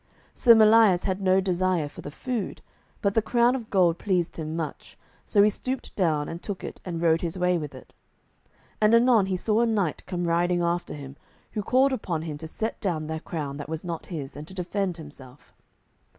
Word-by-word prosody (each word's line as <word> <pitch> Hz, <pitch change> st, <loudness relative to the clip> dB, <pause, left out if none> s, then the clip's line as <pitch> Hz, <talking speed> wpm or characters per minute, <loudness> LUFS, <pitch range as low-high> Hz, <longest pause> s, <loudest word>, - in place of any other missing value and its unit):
Sir 235 Hz, -2 st, +6 dB
Melias 215 Hz, -4 st, +6 dB
had 190 Hz, 0 st, -1 dB
no 190 Hz, 0 st, +4 dB
desire 185 Hz, -3 st, 0 dB
for 145 Hz, -, -11 dB
the -, -, -7 dB
food, 235 Hz, -, -4 dB, 0.4 s
but 200 Hz, -1 st, +2 dB
the 225 Hz, -, +3 dB
crown 240 Hz, +3 st, +3 dB
of 235 Hz, -4 st, -6 dB
gold 175 Hz, -4 st, +3 dB
pleased 180 Hz, -4 st, -1 dB
him 155 Hz, -1 st, -4 dB
much, 165 Hz, -2 st, -6 dB, 0.3 s
so 200 Hz, -2 st, +4 dB
he 210 Hz, -, +5 dB
stooped 260 Hz, +5 st, -5 dB
down 155 Hz, -6 st, +1 dB
and 170 Hz, +1 st, -6 dB
took 200 Hz, -3 st, -5 dB
it -, -, -7 dB
and 170 Hz, -3 st, -4 dB
rode 165 Hz, -1 st, +3 dB
his 170 Hz, 0 st, -3 dB
way 180 Hz, 0 st, +2 dB
with 150 Hz, -3 st, -7 dB
it. 130 Hz, -, -14 dB, 0.9 s
And 215 Hz, +2 st, +5 dB
anon 230 Hz, -4 st, +5 dB
he 190 Hz, -1 st, -1 dB
saw 215 Hz, +4 st, +1 dB
a 235 Hz, -, +3 dB
knight 200 Hz, -8 st, 0 dB
come 175 Hz, -2 st, -2 dB
riding 175 Hz, +1 st, +1 dB
after 170 Hz, -1 st, -1 dB
him, 140 Hz, -1 st, -9 dB, 0.3 s
who 210 Hz, -, -2 dB
called 260 Hz, +6 st, +3 dB
upon 170 Hz, -10 st, -2 dB
him 150 Hz, -3 st, -5 dB
to 160 Hz, -, -6 dB
set 220 Hz, +7 st, -4 dB
down 165 Hz, -6 st, -1 dB
the 160 Hz, +1 st, -4 dB
crown 150 Hz, -4 st, -5 dB
that 145 Hz, 0 st, -7 dB
was 160 Hz, 0 st, -4 dB
not 170 Hz, -2 st, -5 dB
his, 145 Hz, -7 st, -6 dB
and 150 Hz, +1 st, -8 dB
to 190 Hz, -, -11 dB
defend 185 Hz, 0 st, -2 dB
himself. 145 Hz, -4 st, -12 dB
180 Hz, 210 wpm, -26 LUFS, 160-210 Hz, 0.9 s, Sir